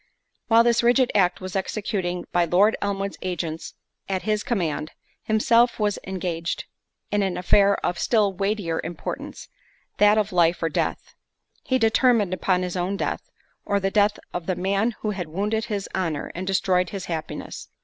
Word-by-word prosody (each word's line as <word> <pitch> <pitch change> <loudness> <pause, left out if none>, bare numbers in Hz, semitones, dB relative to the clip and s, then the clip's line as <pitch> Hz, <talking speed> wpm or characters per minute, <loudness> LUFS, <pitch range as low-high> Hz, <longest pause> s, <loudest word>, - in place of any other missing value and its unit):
While 230 0 +6
this 235 -1 +3
rigid 245 +1 +3
act 180 -3 +2
was 185 0 -6
executing 190 -2 -2
by 175 -1 +3
Lord 195 +6 +4
Elmwood's 200 -1 -2
agents 165 -3 -4 0.3
at 190 -1 -1
his 215 -1 0
command, 160 -9 -1 0.3
himself 230 +3 +3
was 210 -1 0
engaged 175 -3 -3 0.5
in 205 0 +2
an 190 -2 -1
affair 200 +2 +4
of 175 - -1
still 210 -4 +2
weightier 195 -4 -1
importance—that 205 +4 -2
of 215 -1 +1
life 170 -1 +2
or 165 - +2
death:—he 260 - -4
determined 225 -4 +3
upon 185 0 +1
his 180 0 -3
own 185 +2 -1
death, - - -3 0.3
or 200 0 +1
the 195 0 -1
death 205 0 +3 0.2
of 175 -2 -4
the 185 - 0
man 200 +5 0
who 215 - -1
had 185 -4 -4
wounded 210 +7 -1
his 205 -4 -3
honour 165 -6 -2
and 185 +2 -5
destroyed 185 -1 +2
his 195 -3 -5
happiness. 160 -2 -5
195 Hz, 160 wpm, -24 LUFS, 180-210 Hz, 0.5 s, While